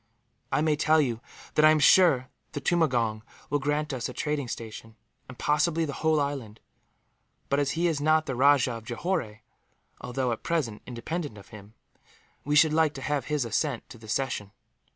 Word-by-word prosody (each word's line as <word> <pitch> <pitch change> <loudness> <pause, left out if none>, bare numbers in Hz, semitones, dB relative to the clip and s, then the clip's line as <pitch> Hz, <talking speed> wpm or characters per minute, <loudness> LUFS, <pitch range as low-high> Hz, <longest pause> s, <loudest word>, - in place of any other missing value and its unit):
I - - +2
may 155 -1 +2
tell 155 +2 +3
you 120 -6 0 0.3
that 155 - +3
I 155 - +8
am 155 - +5
sure 150 -5 +5 0.2
the - - -3
tumangong 125 -9 +1 0.3
will 145 - +2
grant 150 +1 -1
us 125 -2 -3
a - - -7
trading 150 -4 -2
station, 115 -1 -8 0.3
and 130 - -10
possibly 160 +2 +1
the 145 - -5
whole 160 -1 +3
island; 135 -7 -3 0.9
but 140 - +2
as 140 -2 0
he 170 - +1
is 160 -4 0
not 155 +1 +3
the 130 - -3
Rajah 135 -1 +4
of 115 - -13
Johore, 120 - -3 0.6
although 125 0 -2
at 115 - -3
present 145 -11 -2
independent 135 +2 -5
of 100 - -14
him, 105 +1 -13 0.7
we 145 +1 0
should 155 +1 +5
like 155 -1 +2
to - - -7
have 145 -5 -1
his 150 -4 -1
assent 120 +3 -2
to 125 -4 -12
the 110 -1 -13
cession. 105 -5 -2
140 Hz, 185 wpm, -27 LUFS, 120-155 Hz, 0.9 s, I